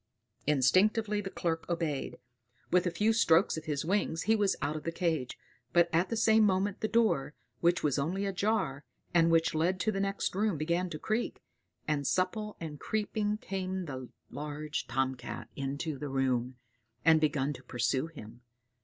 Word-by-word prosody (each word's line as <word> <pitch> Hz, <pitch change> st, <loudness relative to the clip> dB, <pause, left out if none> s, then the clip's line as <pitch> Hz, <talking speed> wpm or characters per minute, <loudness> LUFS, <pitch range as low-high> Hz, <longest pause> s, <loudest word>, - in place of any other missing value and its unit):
Instinctively 205 Hz, -, +3 dB
the 195 Hz, -, -5 dB
Clerk 165 Hz, -3 st, -2 dB
obeyed; 165 Hz, -5 st, -2 dB, 0.5 s
with 180 Hz, 0 st, +3 dB
a -, -, +3 dB
few 210 Hz, +6 st, +2 dB
strokes 170 Hz, -5 st, +4 dB
of 160 Hz, -, -6 dB
his 150 Hz, -1 st, -2 dB
wings 180 Hz, -3 st, 0 dB
he 220 Hz, -, +3 dB
was 205 Hz, -2 st, +2 dB
out 150 Hz, -, -1 dB
of 155 Hz, -, -4 dB
the 165 Hz, -, -3 dB
cage; 165 Hz, -7 st, -1 dB, 0.4 s
but 170 Hz, 0 st, +5 dB
at 170 Hz, +3 st, +2 dB
the 230 Hz, -, -1 dB
same 220 Hz, 0 st, +5 dB
moment 195 Hz, 0 st, +1 dB
the 220 Hz, -, +1 dB
door, 215 Hz, -11 st, +2 dB, 0.2 s
which 175 Hz, +1 st, +2 dB
was 145 Hz, -2 st, +1 dB
only 185 Hz, +8 st, -1 dB
ajar, 195 Hz, -7 st, 0 dB, 0.3 s
and 165 Hz, -1 st, +5 dB
which 165 Hz, 0 st, +3 dB
led 175 Hz, +4 st, +1 dB
to 215 Hz, -, +1 dB
the 195 Hz, -, -2 dB
next 195 Hz, 0 st, -1 dB
room, 200 Hz, -2 st, +1 dB
began 170 Hz, +4 st, 0 dB
to 155 Hz, -, -5 dB
creak, 215 Hz, +8 st, -2 dB, 0.4 s
and 145 Hz, -3 st, 0 dB
supple 210 Hz, +3 st, -1 dB
and 155 Hz, -3 st, -6 dB
creeping 210 Hz, +1 st, -1 dB
came 190 Hz, -2 st, -3 dB
the 130 Hz, -4 st, -6 dB, 0.2 s
large 150 Hz, +1 st, -4 dB
tomcat 130 Hz, +1 st, -3 dB
into 140 Hz, +2 st, -3 dB
the 145 Hz, -, -4 dB
room, 130 Hz, -2 st, 0 dB, 0.5 s
and 160 Hz, -1 st, +6 dB
began 150 Hz, -2 st, +1 dB
to 130 Hz, -, -11 dB
pursue 130 Hz, +3 st, -1 dB
him. 120 Hz, -7 st, -12 dB
165 Hz, 170 wpm, -31 LUFS, 145-195 Hz, 0.5 s, and